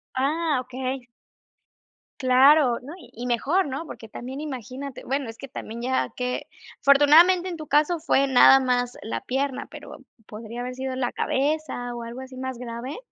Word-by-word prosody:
Ah, 295 +2 +1
okey. 255 0 -5 1.1
Claro. 260 0 +5
No, 275 +5 -9
y 365 - -15
y 240 +2 -7
mejor, 290 - +1
¿no?, 280 +4 -4
porque 225 - -10
también 260 +5 -7
imagínate, 265 -1 -7
bueno, 270 -2 -2
es 225 - -9
que 275 - -9
también 235 -2 -7
ya 260 +2 0
qué 250 0 -3 0.3
afortunadamente, 325 +6 +6
en 345 - -5
tu 310 -1 -8
caso, 305 +4 +2
fue 275 -3 +2
nada 270 0 +7
más 250 -1 0
la 115 0 -4
pierna, 270 0 -2
pero - - -10 0.3
podría 225 +3 -8
haber 250 +1 -5
sido 260 0 -4
la 255 -2 -1
cabeza 275 -3 -1
o 235 - -6
algo 235 +2 -7
así 260 -1 -10
más 260 -1 -4
grave. 245 +3 -6
260 Hz, 170 wpm, -24 LUFS, 245-285 Hz, 1.1 s, nada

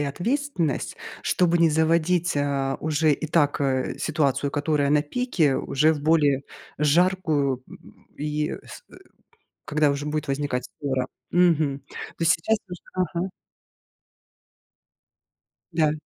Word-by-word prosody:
ответственность, 175 - -1 0.3
чтобы 175 -1 +2
не 165 -1 +5
заводить, 165 +2 +2
а, 140 -1 0
уже 155 0 +2
и 155 - -2
так, 145 -3 +2
э, 130 -2 0
ситуацию, 140 -2 0
которая 145 -1 0
на 150 0 +4
пике, 165 - +1
уже 155 +4 +2
в 150 - -4
более 145 -3 +3 0.4
жаркую, 150 -4 +2
м - - -16
и 150 0 -2
с - - -11
э, - - -13 0.7
когда 150 -1 +2
уже 140 +1 -3
будет 150 0 -2
возникать 135 -2 -1 0.2
ссора. 130 -3 -1 0.2
Мгм. 160 -6 +3
То - - -39 0.3
есть 165 -1 +5
сейчас 220 +7 +1
ты 180 - -12
уже 180 - -8 0.3
ага. 180 +3 -2 2.4
Да. 155 -2 +2
150 Hz, 125 wpm, -24 LUFS, 140-165 Hz, 2.4 s, не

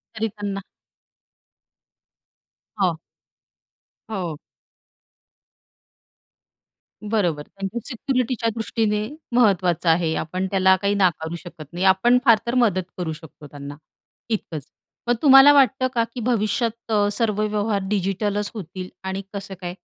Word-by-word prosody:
तरी 220 +1 -1
त्यांना 205 -2 -5 2.2
हो. 175 -4 +2 1.1
हो. 180 -8 -4 2.7
बरोबर, 185 -9 0
त्यांच्या 195 +4 -5
सिक्युरिटीच्या 250 -2 -1
दृष्टीने 215 -2 -1 0.3
महत्त्वाचं 185 -7 +3
आहे. 165 -1 +2
आपण 185 +4 -2
त्याला 190 -1 +5
काही 200 0 +1
नाकारू 170 -4 +1
शकत 170 -3 -10
नाही. 180 +2 -1
आपण 190 +6 +5
फार 230 -4 +7
तर 235 +2 -1
मदत 205 -7 +3
करू 170 -3 -3
शकतो 155 -2 -13
त्यांना 145 0 -9 0.5
इतकंच. 165 - -3 0.4
मग 240 - +3
तुम्हाला 275 0 +9
वाटतं 265 -2 +4
का 230 - +2
की 250 - -5
भविष्यात 230 0 -1
अ, 205 -1 +3
सर्व 210 -1 0
व्यवहार 210 -1 0
डिजिटलच 205 +1 -1
होतील 185 -3 -7 0.2
आणि 190 +1 -3
कसं 200 -1 -6
काय? 175 -1 -4
205 Hz, 115 wpm, -23 LUFS, 180-225 Hz, 2.7 s, तुम्हाला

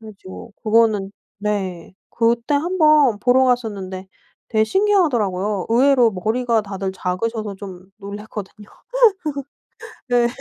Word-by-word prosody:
그래가지고 215 0 -11
그거는 215 -3 +2 0.3
네 190 -4 -3 0.2
그때 235 +3 +1
한 340 +6 -1
번 300 -8 +5
보러 255 +2 +4
갔었는데 200 -7 -2 0.4
되게 220 -1 +2
신기하더라고요. 220 - +1
의외로 250 -1 +4
머리가 225 +4 0
다들 195 -1 -4
작으셔서 210 +3 -3
좀 185 -2 -10
놀랐거든요. 210 0 -9 1.4
네 240 -1 +3
220 Hz, 270 characters per minute, -20 LUFS, 195-245 Hz, 1.4 s, 번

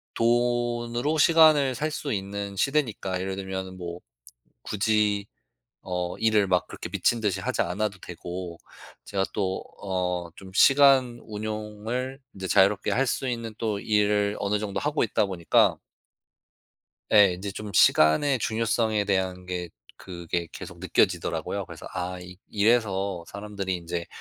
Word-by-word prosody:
돈으로 120 +3 +1
시간을 155 -5 +5
살 155 +4 -2
수 145 -3 -3
있는 100 0 -4
시대니까 110 -7 0
예를 95 0 -3
들면은 95 -1 -5
뭐 85 -1 -6 0.6
굳이 105 -1 +1 0.6
어 90 -1 -3
일을 110 -3 +3
막 90 -3 +2
그렇게 - - -7
미친 120 - +1
듯이 100 -3 0
하지 - - -1
않아도 100 +2 -2
되고 90 -1 -7 0.5
제가 95 -1 -1
또 95 -2 -1 0.2
어 95 -2 -1 0.3
좀 95 -1 -11
시간 135 -1 +5
운용을 110 +4 -4 0.2
인제 95 -1 -5
자유롭게 100 +1 +3
할 135 +2 +2
수 130 +1 -1
있는 115 -2 -4
또 110 -3 -1
일을 105 -1 +1
어느 105 +1 0
정도 100 -2 -3
하고 150 -1 +1
있다 105 -2 +1
보니까 90 -4 +2 1.4
예. 100 -4 +7
인제 100 +3 -5
좀 105 +1 -7
시간의 120 - +4
중요성에 110 -1 0
대한 95 -2 -1
게 90 -1 -4 0.3
그게 85 -1 -4
계속 - - -9
느껴지더라고요. - - 0
그래서 - - -10
'아 90 0 -3
이 90 0 -11
이래서 100 -4 +1
사람들이 100 -2 -4
인제 85 0 -5
105 Hz, 280 characters per minute, -26 LUFS, 95-115 Hz, 1.4 s, 예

